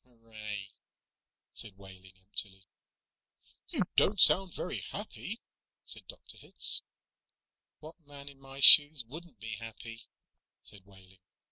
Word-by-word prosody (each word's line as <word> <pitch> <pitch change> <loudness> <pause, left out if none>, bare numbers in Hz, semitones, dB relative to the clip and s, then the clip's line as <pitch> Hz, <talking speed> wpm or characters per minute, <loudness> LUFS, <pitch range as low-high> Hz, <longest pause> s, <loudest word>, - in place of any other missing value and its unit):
"Hooray," 110 -4 -10 0.8
said 105 -4 -5
Wehling 95 -1 -16
emptily. 95 0 +2 1.0
"You - - -2
don't 205 0 +1
sound 190 +1 +5
very 180 - -5
happy," 210 +2 -9 0.4
said - - -6
Dr. - - -9
Hitz. - - +1 1.0
"What 160 +3 -13
man 140 -1 -12
in 140 -1 -12
my 135 0 -11
shoes 145 -3 +8
wouldn't 160 +8 -13
be 110 -2 -8
happy?" 115 0 -11 0.6
said 100 -2 -15
Wehling. 95 -1 -18
115 Hz, 115 wpm, -29 LUFS, 100-145 Hz, 1.0 s, shoes